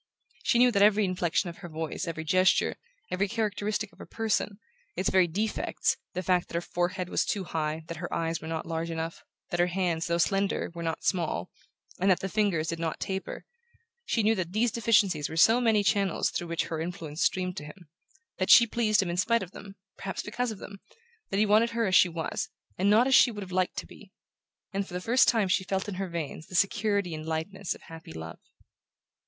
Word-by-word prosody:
She -, -, +3 dB
knew 245 Hz, +1 st, +6 dB
that 200 Hz, -3 st, +2 dB
every 210 Hz, 0 st, +5 dB
inflexion 180 Hz, -1 st, 0 dB
of 170 Hz, -, -16 dB
her 175 Hz, -, -9 dB
voice, 160 Hz, +2 st, -4 dB
every 160 Hz, -1 st, -4 dB
gesture, 185 Hz, +4 st, +3 dB, 0.4 s
every 195 Hz, +2 st, +1 dB
characteristic 210 Hz, -1 st, -2 dB
of -, -, -22 dB
her -, -, -10 dB
person 215 Hz, -2 st, -1 dB, 0.4 s
its 185 Hz, -, 0 dB
very 185 Hz, -2 st, +5 dB
defects, 210 Hz, +6 st, -1 dB, 0.2 s
the 185 Hz, -, -2 dB
fact 180 Hz, -1 st, +2 dB
that -, -, -9 dB
her 170 Hz, -, +1 dB
forehead 175 Hz, +1 st, -2 dB
was -, -, +1 dB
too 200 Hz, -3 st, -2 dB
high, 160 Hz, -2 st, -3 dB
that 165 Hz, 0 st, -7 dB
her 175 Hz, +2 st, -6 dB
eyes 165 Hz, 0 st, -1 dB
were 160 Hz, -, -7 dB
not 160 Hz, -1 st, -3 dB
large 165 Hz, 0 st, -3 dB
enough, 165 Hz, 0 st, -4 dB, 0.3 s
that 175 Hz, -, -1 dB
her 175 Hz, -, +4 dB
hands, 175 Hz, -1 st, -1 dB
though 170 Hz, 0 st, +1 dB
slender, 195 Hz, +2 st, 0 dB
were 170 Hz, -, -7 dB
not 165 Hz, -1 st, -3 dB
small, 165 Hz, -, -1 dB, 0.5 s
and 190 Hz, +2 st, +2 dB
that 185 Hz, -, +4 dB
the 195 Hz, -, -3 dB
fingers 195 Hz, -6 st, +1 dB
did 165 Hz, -, -3 dB
not 165 Hz, -1 st, -2 dB
taper 190 Hz, 0 st, -4 dB, 0.6 s
she 260 Hz, -, 0 dB
knew 220 Hz, +2 st, +4 dB
that 185 Hz, -4 st, -3 dB
these 230 Hz, +2 st, +2 dB
deficiencies 210 Hz, -10 st, +2 dB
were 160 Hz, -, -6 dB
so 225 Hz, +8 st, +6 dB
many 220 Hz, -3 st, +3 dB
channels 200 Hz, -3 st, +1 dB
through 175 Hz, -, -3 dB
which 170 Hz, 0 st, -1 dB
her 160 Hz, -1 st, -4 dB
influence 165 Hz, -3 st, -5 dB
streamed 185 Hz, -1 st, +1 dB
to -, -, -5 dB
him; 170 Hz, +3 st, -12 dB, 0.5 s
that 185 Hz, -, 0 dB
she 235 Hz, -, +9 dB
pleased 215 Hz, -3 st, +2 dB
him 180 Hz, -, -4 dB
in 175 Hz, -, -3 dB
spite 230 Hz, +4 st, +2 dB
of 180 Hz, -, -9 dB
them, 200 Hz, -1 st, -11 dB, 0.2 s
perhaps 195 Hz, -, -4 dB
because 245 Hz, +3 st, -2 dB
of 215 Hz, -, -5 dB
them; 200 Hz, +1 st, -10 dB, 0.5 s
that 195 Hz, -, -1 dB
he 215 Hz, -, +4 dB
wanted 215 Hz, +3 st, +4 dB
her 230 Hz, 0 st, 0 dB
as 190 Hz, -, -1 dB
she 185 Hz, -, +7 dB
was, 165 Hz, -1 st, -3 dB, 0.3 s
and 195 Hz, +2 st, +2 dB
not 220 Hz, +4 st, +5 dB
as 265 Hz, -, +2 dB
she 255 Hz, -, +7 dB
would 210 Hz, -3 st, -6 dB
have 185 Hz, -, -10 dB
liked 185 Hz, 0 st, 0 dB
to -, -, -3 dB
be; -, -, -15 dB, 0.6 s
and 195 Hz, 0 st, -1 dB
for -, -, -11 dB
the -, -, -1 dB
first 235 Hz, +7 st, +4 dB
time 225 Hz, -4 st, +3 dB
she 185 Hz, +1 st, +2 dB
felt 190 Hz, +1 st, -2 dB
in 205 Hz, -, -4 dB
her 190 Hz, -, -3 dB
veins 160 Hz, -2 st, -5 dB
the 180 Hz, -, -9 dB
security 200 Hz, -1 st, +1 dB
and 155 Hz, 0 st, -6 dB
lightness 170 Hz, +4 st, -3 dB
of -, -, -16 dB
happy 165 Hz, -, -11 dB
love. 80 Hz, +1 st, -8 dB
185 Hz, 225 wpm, -28 LUFS, 165-210 Hz, 0.6 s, she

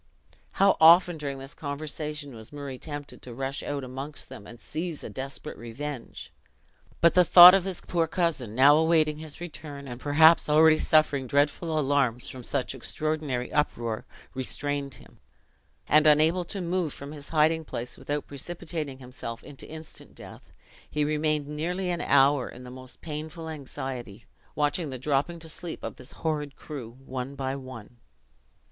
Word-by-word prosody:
How 195 Hz, 0 st, +4 dB
often, 170 Hz, +2 st, +7 dB
during 140 Hz, -2 st, -4 dB
this 135 Hz, +1 st, -9 dB
conversation, 150 Hz, 0 st, -5 dB
was 110 Hz, -1 st, -11 dB
Murray 140 Hz, -3 st, -7 dB
tempted 145 Hz, -2 st, -7 dB
to 120 Hz, -2 st, -10 dB
rush 135 Hz, +1 st, -3 dB
out 145 Hz, -1 st, -4 dB
amongst 135 Hz, +3 st, -7 dB
them, 100 Hz, -, -10 dB
and 120 Hz, +2 st, -12 dB
seize 165 Hz, +3 st, -4 dB
a -, -, -7 dB
desperate 135 Hz, +3 st, -7 dB
revenge! 125 Hz, +3 st, -7 dB, 0.7 s
But 170 Hz, -, +6 dB
the 180 Hz, -, +6 dB
thought 180 Hz, +1 st, +11 dB
of 195 Hz, -2 st, +3 dB
his 190 Hz, -3 st, -4 dB
poor 170 Hz, -2 st, 0 dB
cousin, 155 Hz, -, -1 dB
now 140 Hz, +4 st, +7 dB
awaiting 155 Hz, -2 st, +3 dB
his 155 Hz, -2 st, -8 dB
return, 150 Hz, -4 st, -8 dB
and 120 Hz, 0 st, -8 dB
perhaps 155 Hz, +3 st, +5 dB
already 155 Hz, +1 st, +6 dB
suffering 150 Hz, -4 st, +3 dB
dreadful 150 Hz, +4 st, +1 dB
alarms 135 Hz, -5 st, +1 dB
from 130 Hz, -1 st, -9 dB
such 135 Hz, +1 st, -2 dB
extraordinary 145 Hz, -1 st, -3 dB
uproar, 115 Hz, -7 st, -1 dB, 0.3 s
restrained 140 Hz, +1 st, -3 dB
him; -, -, -17 dB, 0.7 s
and 155 Hz, +1 st, +5 dB
unable 160 Hz, +4 st, +4 dB
to 195 Hz, +2 st, -4 dB
move 175 Hz, -3 st, -1 dB
from 140 Hz, +1 st, -8 dB
his 145 Hz, -2 st, -9 dB
hiding 160 Hz, +1 st, +3 dB
place 125 Hz, -5 st, -5 dB
without 145 Hz, 0 st, -4 dB
precipitating 155 Hz, -1 st, -5 dB
himself 125 Hz, -2 st, -8 dB
into 140 Hz, -2 st, -10 dB
instant 160 Hz, 0 st, -9 dB
death, -, -, -13 dB, 0.4 s
he 150 Hz, 0 st, 0 dB
remained 150 Hz, 0 st, 0 dB
nearly 175 Hz, +5 st, -2 dB
an 175 Hz, -, -2 dB
hour 140 Hz, -1 st, +4 dB
in 125 Hz, -, -11 dB
the 125 Hz, -, -9 dB
most 130 Hz, 0 st, -9 dB
painful 155 Hz, +1 st, -6 dB
anxiety, 130 Hz, -7 st, -7 dB, 0.3 s
watching 150 Hz, +2 st, 0 dB
the 130 Hz, -, -5 dB
dropping 145 Hz, +6 st, 0 dB
to 165 Hz, 0 st, -9 dB
sleep 165 Hz, +1 st, -7 dB
of -, -, -5 dB
this 130 Hz, +3 st, -9 dB
horrid 150 Hz, -3 st, -1 dB
crew, 125 Hz, -6 st, -8 dB
one 130 Hz, +1 st, -5 dB
by 135 Hz, -1 st, -3 dB
one. 130 Hz, -4 st, -10 dB
145 Hz, 160 wpm, -27 LUFS, 130-160 Hz, 0.7 s, thought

